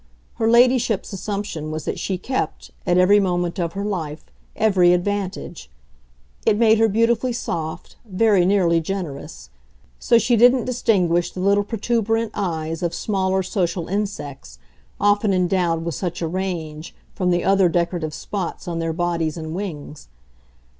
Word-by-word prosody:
Her 225 - +1
ladyship's 240 -3 +3
assumption 195 -5 -4
was 155 -1 -5
that - - -3
she 190 - -2
kept, 255 +8 -4 0.2
at 175 - +3
every 190 +3 +6
moment 175 -2 -1
of 170 -1 -2
her 200 +1 -3
life, 165 -7 -4 0.3
every 190 -5 +4
advantage 190 -1 -3 0.7
it 205 - +3
made 220 -1 +4
her 225 - +5
beautifully 230 +3 +1
soft, 165 -7 -5
very 205 -2 +2
nearly 180 -3 +3
generous; 160 - -6 0.5
so 235 - +4
she 235 +1 +2
didn't 245 +2 +5
distinguish 185 -9 +1
the - - -8
little 200 +2 +3
protuberant 225 +1 -1
eyes 165 -4 -3
of 170 -1 -1
smaller 190 -2 0
social 180 -3 -2
insects, 145 - -4 0.4
often 205 -1 +2
endowed 175 -2 +1
with 170 - -2
such 175 +3 -4
a - - 0
range, 165 -3 -4 0.2
from 180 -2 -1
the 175 0 +1
other 195 -2 +4
decorative 170 -2 -1
spots 190 -2 -5
on 170 -1 -3
their 165 0 -1
bodies 170 -2 -1
and 160 -1 -5
wings. 160 - -6
185 Hz, 145 wpm, -21 LUFS, 170-205 Hz, 0.7 s, every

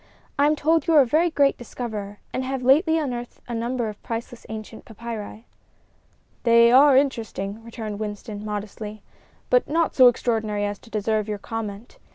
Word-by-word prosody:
"I 285 - +5
am 305 - +3
told 320 +3 +1
you 330 - +4
are 295 - +9
a - - +4
very 320 +8 +2
great 285 -3 +2
discoverer, 215 -4 -6 0.2
and 255 - -1
have 260 0 -3
lately 320 +6 +4
unearthed 245 -6 -4
a 240 - -5
number 235 +1 -2
of 210 -1 -8
priceless 235 0 -6
ancient 220 0 -8
papyri." 225 0 -8 1.0
"They 235 0 +6
are 270 +1 +7
interesting," 225 -6 -1
returned 220 -3 -6
Winston, 210 0 -6
modestly, 210 0 -6 0.5
"but - - +3
not 330 +2 +1
so 255 -2 +7
extraordinary 220 -4 0
as 205 0 -4
to 235 - -17
deserve 215 0 -1
your 210 -1 -3
comment. 215 +1 -7
230 Hz, 170 wpm, -24 LUFS, 215-265 Hz, 1.0 s, are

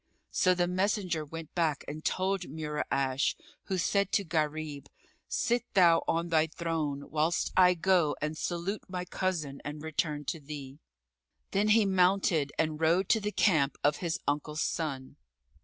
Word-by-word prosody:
'" - - -47
So 185 -1 +3
the 175 0 +2
messenger 185 -3 0
went 160 +1 -8
back 160 -5 0
and 155 +2 -6
told 190 0 0
Mura'ash, 140 -3 -1 0.3
who 190 - -2
said 200 +2 +1
to 200 - +3
Gharib, 155 -3 -2 0.4
"Sit 240 +1 0
thou 170 -3 +6
on 170 +1 0
thy 160 -1 +3
throne 155 -4 -3
whilst 160 +3 +1
I 180 -1 +6
go 175 -3 +2
and 150 +1 -2
salute 175 +5 -3
my 180 -1 -4
cousin 170 -7 -3
and 150 +1 -6
return 150 -1 -2
to 165 +3 -3
thee." 140 -1 -8 0.7
Then 205 +2 +2
he 215 0 +5
mounted 180 -6 +2
and 155 -1 -1
rode 170 +4 +3
to 225 - +4
the 210 0 -2
camp 155 -10 +2
of 145 +1 +3
his 170 -3 -2
uncle's 150 +1 -1
son. 140 -4 -3
160 Hz, 155 wpm, -30 LUFS, 150-185 Hz, 0.7 s, thou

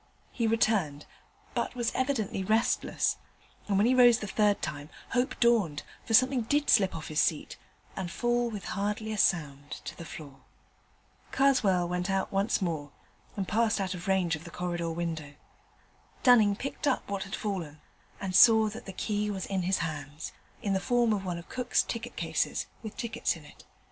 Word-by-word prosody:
He 230 -2 0
returned, 205 -10 +1 0.5
but - - -2
was 240 -2 0
evidently 255 -8 -1
restless: 220 +4 +1 0.5
and, 200 -2 +1
when 205 - +4
he 250 - +4
rose 245 -2 +7
the 215 - -5
third 205 0 +2
time, 145 0 -5 0.2
hope 250 +2 0
dawned, 215 -11 +2 0.2
for 225 - +3
something 255 +1 +4
did 290 +6 +1
slip 195 -5 +4
off 160 - -6
his 155 -1 0
seat 155 -3 0 0.4
and 190 -2 -4
fall 240 +5 0
with 210 -3 -6
hardly 210 +2 -2
a - - -4
sound 145 -6 +1 0.2
to - - -6
the - - -8
floor. 145 -4 -10 0.9
Karswell 215 -10 +3
went 180 +2 -2
out 195 0 0
once 200 +1 +1
more, 155 -5 -2 0.5
and 195 -2 -2
passed 220 -1 +2
out 190 -1 -1
of 180 0 -8
range 185 -4 +2
of 150 - -10
the 170 - -9
corridor 175 -1 -3
window. 160 -3 -4 0.9
Dunning 220 -5 +6
picked 275 +6 -4
up 265 - 0
what 200 -1 -3
had 195 +1 -4
fallen, 175 -8 -4 0.4
and 190 -2 -3
saw 220 0 +7
that 225 +2 -9
the 195 - -6
key 210 +2 -1
was 195 -2 -3
in 195 -1 -1
his 185 +2 +1
hands 150 0 -6 0.3
in 200 - 0
the 190 - +2
form 240 +1 +2
of 200 -2 -2
one 175 -2 -2
of 170 - -10
Cook's 250 -1 +1
ticket 230 - -5
cases, - - -1 0.2
with 220 -2 -8
tickets 235 -6 -1
in 160 -3 -13
it. - - -16
200 Hz, 185 wpm, -29 LUFS, 170-230 Hz, 0.9 s, rose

